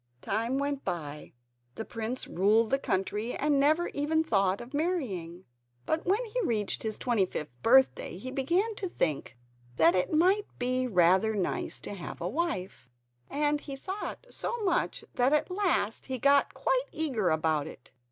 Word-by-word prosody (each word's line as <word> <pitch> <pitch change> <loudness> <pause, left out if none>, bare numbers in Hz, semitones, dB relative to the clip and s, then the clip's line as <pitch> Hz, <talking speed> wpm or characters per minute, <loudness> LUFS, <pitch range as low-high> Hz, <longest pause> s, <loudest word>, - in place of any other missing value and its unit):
Time 230 +4 -1
went 280 0 -2
by. 150 -5 -5 0.4
The 225 - -5
prince 230 +2 -4
ruled 215 +5 +2
the 270 - +3
country 210 +3 -1
and 290 -1 +2
never 310 +5 +3
even 315 +3 +1
thought 195 -8 +1
of 240 +3 -10
marrying. 215 - -2 0.4
But 320 +2 -1
when 415 +7 +2
he - - -2
reached 215 - -1
his 220 -1 -3
twenty 225 -7 +1
fifth 150 -5 -5
birthday 260 -7 +4
he 255 +7 -6
began 345 +12 +1
to 375 - -3
think 150 - -2 0.4
that 165 +5 +5
it 180 -1 0
might 370 +6 +3
be 255 +1 0
rather 190 +2 +4
nice 190 -3 -2
to - - -6
have 185 -4 -7
a 170 - -2
wife, 190 - -3 0.4
and 295 0 0
he 275 - -6
thought 385 - -6
so 475 - -3
much 400 +5 0
that 250 +3 +2
at 300 +4 +1
last 365 - 0
he 260 -1 -2
got 280 +3 +3
quite - - 0
eager 250 - 0
about 155 -2 +1
it. - - -12
255 Hz, 165 wpm, -29 LUFS, 190-315 Hz, 0.4 s, that